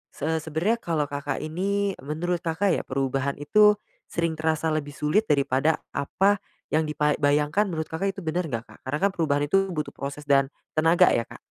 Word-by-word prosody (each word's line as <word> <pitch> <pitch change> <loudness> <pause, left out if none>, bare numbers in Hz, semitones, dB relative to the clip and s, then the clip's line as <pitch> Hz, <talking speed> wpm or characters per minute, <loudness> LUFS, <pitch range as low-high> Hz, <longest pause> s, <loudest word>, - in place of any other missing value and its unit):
Se 160 +2 -1
sebenernya 160 +10 0
kalo 160 -6 0
Kakak 145 0 -3
ini 195 +5 -1
menurut 165 +5 -2
Kakak 175 +4 0
ya - - +1
perubahan 135 +1 -1
itu, 210 +9 +5 0.3
sering 170 -1 -1
terasa 160 0 0
lebih 145 -2 -3
sulit 195 +9 +1
daripada 140 +2 +2 0.2
apa, 195 +9 +1 0.3
yang 155 0 +2
dipa 150 0 +1
bayangkan 150 +8 +2
menurut 160 -3 -3
Kakak 195 +4 -1
itu 195 - -7
bener 165 +2 -1
nggak, 115 -4 -3
Kak? - - -17
Karena 145 +3 0
kan 200 - +4
perubahan 150 -5 0
itu 195 +6 +2
butuh 150 -1 -3
proses 140 +1 -6
dan 140 -2 +3 0.3
tenaga 165 +2 +5
ya, 115 - 0
Kak? - - -11
155 Hz, 185 wpm, -25 LUFS, 145-180 Hz, 0.3 s, itu